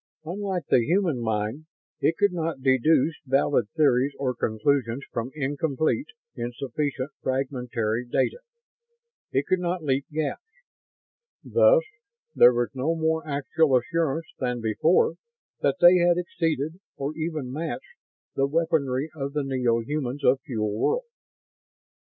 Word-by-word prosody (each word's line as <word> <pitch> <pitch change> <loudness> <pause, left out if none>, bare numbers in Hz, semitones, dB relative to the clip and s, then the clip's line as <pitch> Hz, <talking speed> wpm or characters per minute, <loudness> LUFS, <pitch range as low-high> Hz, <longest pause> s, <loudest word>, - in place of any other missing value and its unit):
Unlike 190 +1 -3
the 120 - +5
human 170 - +1
mind, 110 +7 -2 0.3
it 165 - +1
could 205 -2 +3
not 165 -5 -3
deduce 140 +4 +3
valid 135 -4 +2
theories 140 -3 +3
or 130 -2 -1
conclusions 120 +2 0
from 115 +1 -3
incomplete, 150 - -1 0.3
insufficient, 130 +3 -3
fragmentary 125 -3 -2
data. 130 - 0 0.9
It 135 +2 +1
could 185 0 +1
not 175 -1 -2
leap 135 -1 0
gaps. 150 - -2 1.0
Thus - - +5 0.5
there 120 - +7
was 120 -1 0
no 140 +5 0
more 160 0 0
actual 145 0 +2
assurance 160 +4 -1
than 125 -2 -1
before 155 - +2 0.4
that - - +1
they 175 +1 +8
had 175 0 +3
exceeded, 165 -2 -2 0.2
or 140 +2 -3
even 155 -5 -3
matched, 165 - -5 0.4
the 135 0 +1
weaponry 150 -3 0
of 140 -2 -5
the 150 -1 0
neo 125 -4 +1
humans 140 +1 -3
of 130 +1 +4
Fuel 105 -5 -2
World. - - +1
140 Hz, 125 wpm, -25 LUFS, 125-165 Hz, 1.0 s, they